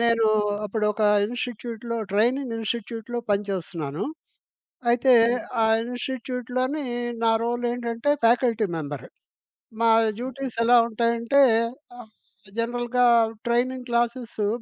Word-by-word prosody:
నేను 230 -1 +3 0.4
అప్పుడు 210 +1 -2
ఒక 215 - -3 0.2
ఇన్‌స్టిట్యూట్‌లో 235 0 -5 0.2
ట్రైనింగ్ 240 +4 +1
ఇన్‌స్టిట్యూట్‌లో 230 +1 -4
పనిచేస్తున్నాను. 180 -7 -2 0.9
అయితే 250 +2 +4 0.5
ఆ - - +4 0.2
ఇన్‌స్టిట్యూట్‌లోని 255 +3 -3 0.4
నా 225 - +4
రోల్ 240 +1 -2
ఏంటంటే, 235 +3 -1
ఫ్యాకల్టీ 230 -2 +3
మెంబర్. 145 -4 -6 0.8
మా 230 - +4 0.3
డ్యూటీస్ 260 0 -5
ఎలా 240 +1 +6
ఉంటాయంటే, 235 +3 +1 0.6
ఆహ్, 220 - -12 0.5
జనరల్‌‌గా 240 +1 0 0.4
ట్రైనింగ్ 250 +2 0
క్లాసెసు 235 -3 -1
235 Hz, 95 wpm, -24 LUFS, 225-245 Hz, 0.9 s, ఎలా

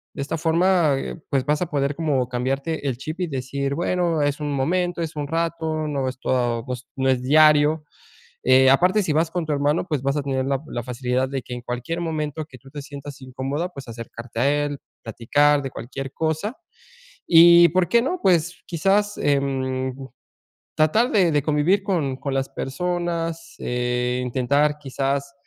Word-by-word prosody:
De - - -3
esta 160 +4 -3
forma, 170 -1 +3
eh, - - -4
pues 135 -3 0
vas 150 +3 +1
a 180 - 0
poder 140 -2 0
como 140 -6 0
cambiarte 135 +5 -2
el 125 - -1
chip 155 +6 -6
y 180 - -1
decir, 140 0 -3
bueno, 170 -1 0
es 145 +1 0
un 150 -1 -3
momento, 175 +6 0
es 160 -2 -4
un 145 -1 -3
rato, 165 0 -1
no 135 -3 -1
es 130 - -8
todo, 120 -3 0
pues, 125 0 -6
no 130 0 0
es 130 -1 +2
diario. 150 +2 +4 0.6
Eh, 130 +1 +6
aparte, 180 +9 +4
si 160 - 0
vas 160 +2 +1
con 175 -2 -2
tu 155 - -1
hermano, 145 +4 +1
pues, 150 -6 -1
vas 140 +2 0
a - - 0
tener 135 -1 -1
la 135 0 0
la 120 - -4
facilidad 125 +1 -1
de 135 -1 -3
que 125 - -8
en 125 - -7
cualquier 125 +8 -4
momento 155 -2 -3
que 135 -4 -14
tú 135 - -16
te 145 +1 -7
sientas 140 -1 -9
incómoda, 135 +6 -3
pues 140 -7 -10
acercarte 115 0 -8
a 145 +3 +2
él, 145 -1 -4 0.2
platicar 145 +6 +2
de 135 - -5
cualquier 135 +3 -7
cosa. 160 - -2 0.7
Y, 170 0 +8
¿por 180 +1 +1
qué 235 +4 +4
no?, 350 +9 -2
pues 175 -1 +2
quizás, 200 +5 +1
em, 130 -2 0 0.8
tratar 185 +11 +3
de 185 -6 +3
de 145 -1 +2
convivir 155 +7 +2
con 160 -10 -1
con 140 0 -4
las 135 0 -1
personas, 170 +2 -3
eh, 125 0 -1
intentar 140 +4 +1
quizás 140 0 -2
145 Hz, 185 wpm, -23 LUFS, 130-165 Hz, 0.8 s, Y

